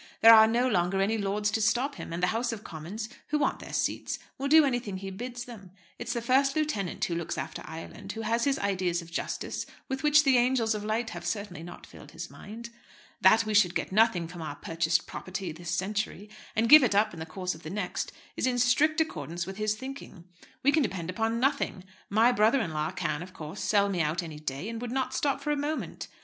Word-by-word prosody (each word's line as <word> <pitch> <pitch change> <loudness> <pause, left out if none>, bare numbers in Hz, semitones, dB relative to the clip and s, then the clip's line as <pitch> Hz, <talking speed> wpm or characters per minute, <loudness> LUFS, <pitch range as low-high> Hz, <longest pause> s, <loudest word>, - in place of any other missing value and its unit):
There 230 0 +10
are 220 0 +9
no 240 +3 +2
longer 190 -3 +1
any 215 +3 +1
lords 205 +1 0
to 220 - 0
stop 245 +6 +2
him, 275 - -8
and 170 +2 -4
the 180 - +3
House 240 +2 0
of 220 -2 -6
Commons, 175 +8 -6 0.2
who 300 - +1
want 295 - 0
their - - -9
seats, - - -1 0.2
will 275 - -1
do 310 +1 +7
anything 245 -7 -1
he 195 0 -6
bids 240 +4 -6
them. 215 -6 -11 0.3
It's 240 - -3
the 235 - -3
First 270 +3 +3
Lieutenant 295 - -1
who 175 - -3
looks 170 -1 -3
after - - -5
Ireland, 165 +5 -8
who 225 - -5
has 230 +3 0
ideas 185 -3 0
of 170 - -14
justice - - -3 0.2
with 265 -1 -3
which 300 0 +5
the 265 -3 +5
angels 240 -2 +2
of 210 -1 -4
light 225 +2 -1
have - - -7
certainly 200 -5 -4
not 175 +1 -10
filled - - -14
his 170 +1 -7
mind. 230 +3 -9 0.5
That 220 +4 +6
we 215 - -2
should 190 -4 +4
get - - -2
nothing 195 -5 +3
from 175 0 -9
our 155 -2 -5
purchased 165 +1 0
property 185 -2 -5
this 170 +2 -8
century, 205 +3 -2 0.2
and 225 +1 +2
give 300 +3 +10
it 220 -5 +2
up 215 +2 +3
in 165 - -9
the 160 - -4
course 185 +3 -3
of 160 - -12
the 155 - -7
next, 190 0 -3 0.2
is - - 0
in 250 -1 +1
strict 285 +6 +3
accordance 170 - -3
with 190 +1 -7
his 215 0 0
thinking. 260 -7 -9 0.4
We 280 - +5
can 310 - +3
depend 185 - -2
upon 225 +4 -1
nothing. 260 -8 0 0.3
My 225 +4 +5
brother 225 +3 +4
in 165 -9 -2
law 155 0 -1
can, 155 -3 -2
of 180 +1 -9
course, 155 +5 -7
sell 200 -1 +3
me 185 -4 0
out 155 +4 0
any 155 -3 -8
day, 150 +4 -4
and 230 0 -5
would 245 - -4
not 260 0 -1
stop 280 0 0
for 295 - -1
a - - +2
moment. 295 +2 -3
210 Hz, 230 wpm, -28 LUFS, 180-245 Hz, 0.5 s, There